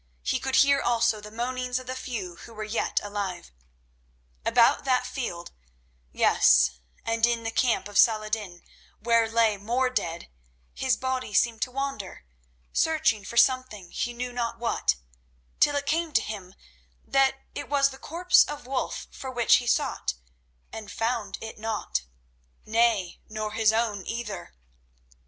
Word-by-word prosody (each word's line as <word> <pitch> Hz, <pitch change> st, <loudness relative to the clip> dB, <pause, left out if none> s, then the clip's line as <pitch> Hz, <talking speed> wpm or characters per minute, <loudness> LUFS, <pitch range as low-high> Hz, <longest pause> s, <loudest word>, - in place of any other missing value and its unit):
He -, -, 0 dB
could 265 Hz, 0 st, -1 dB
hear 280 Hz, -1 st, +5 dB
also 230 Hz, -3 st, +2 dB
the 210 Hz, -, -9 dB
moanings 250 Hz, +2 st, -2 dB
of 255 Hz, -, -6 dB
the 255 Hz, -, -4 dB
few 210 Hz, -9 st, -5 dB
who 230 Hz, -, -12 dB
were 215 Hz, -, -5 dB
yet 215 Hz, +2 st, 0 dB
alive. 200 Hz, -4 st, -4 dB, 0.9 s
About -, -, +4 dB
that 255 Hz, -2 st, +2 dB
field—yes, 60 Hz, -, +1 dB, 0.3 s
and 225 Hz, 0 st, -1 dB
in 235 Hz, -1 st, +3 dB
the 225 Hz, -, -2 dB
camp 225 Hz, -6 st, +1 dB
of 205 Hz, -1 st, 0 dB
Saladin, 215 Hz, -5 st, +2 dB, 0.4 s
where 230 Hz, 0 st, +3 dB
lay 225 Hz, -2 st, +3 dB
more 245 Hz, +6 st, 0 dB
dead—his 65 Hz, -, -3 dB
body 260 Hz, -5 st, -3 dB
seemed 230 Hz, 0 st, +2 dB
to -, -, 0 dB
wander 270 Hz, -, -4 dB, 0.5 s
searching 305 Hz, -10 st, +2 dB
for 235 Hz, -, -7 dB
something, 255 Hz, -8 st, +2 dB
he 240 Hz, -, -2 dB
knew 245 Hz, +1 st, -5 dB
not 235 Hz, -1 st, -2 dB
what, 235 Hz, -, +1 dB, 0.6 s
till 290 Hz, -, +4 dB
it 285 Hz, 0 st, -1 dB
came 325 Hz, +2 st, 0 dB
to -, -, +4 dB
him 195 Hz, -4 st, -7 dB, 0.5 s
that 270 Hz, -1 st, +3 dB, 0.2 s
it -, -, -6 dB
was 280 Hz, -1 st, +3 dB
the 265 Hz, -, -12 dB
corpse 355 Hz, +3 st, +4 dB
of 295 Hz, -4 st, -7 dB
Wulf 260 Hz, 0 st, -3 dB
for 265 Hz, -, -7 dB
which 240 Hz, -2 st, +4 dB
he 245 Hz, -, -4 dB
sought 65 Hz, -, 0 dB, 0.6 s
and 215 Hz, -2 st, -7 dB
found 230 Hz, -1 st, -2 dB
it 220 Hz, -1 st, -8 dB
not—nay, 175 Hz, -, -2 dB
nor 215 Hz, 0 st, -4 dB
his 220 Hz, 0 st, +3 dB
own 220 Hz, -3 st, 0 dB
either. 230 Hz, -4 st, -5 dB
225 Hz, 145 wpm, -27 LUFS, 200-255 Hz, 0.9 s, hear